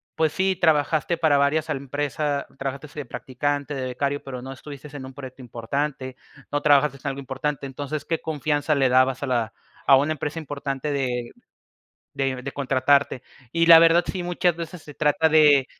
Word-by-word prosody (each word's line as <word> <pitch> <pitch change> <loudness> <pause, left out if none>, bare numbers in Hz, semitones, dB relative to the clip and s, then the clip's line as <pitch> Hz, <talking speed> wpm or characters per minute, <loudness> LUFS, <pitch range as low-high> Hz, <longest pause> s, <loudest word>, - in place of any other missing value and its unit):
pues 160 -2 +2
sí, 190 +2 +1
trabajaste 160 0 +2
para 155 -4 +3
varias 145 +2 +1
al - - 0
empresa, 145 +1 -2
trabajaste 135 +2 -5
de 140 - -5
practicante, 145 +4 -3
de 130 -1 -3
becario, 140 +3 -2
pero 130 -2 -7
no 135 +1 -7
estuviste 140 +1 -10
en 130 -2 -7
un 130 - -10
proyecto 130 -1 -10
importante, 130 +3 -4 0.4
no 145 0 0
trabajaste 145 -1 +4
en - - -4
algo 135 0 -5
importante, 140 +2 -3
entonces, 140 +2 -5
¿qué 165 - -1
confianza 150 -1 -1
le 135 -2 +3
dabas 130 +1 +3
a - - -2
la 120 -3 -1 0.3
a 135 -1 +7
una 145 +3 +1
empresa 150 +1 -4
importante 145 -1 -4
de 125 -3 -2 0.8
de 130 -2 -2
de 140 - -5
contratarte? 135 -1 +1 0.3
Y 165 +4 +2
la 165 -1 +10
verdad 165 +1 +5
sí, 185 -2 -4
muchas 175 -1 0
veces 170 0 -7
se 150 - -12
trata 150 +2 +2
de, 150 -4 +5
140 Hz, 180 wpm, -24 LUFS, 135-155 Hz, 0.8 s, la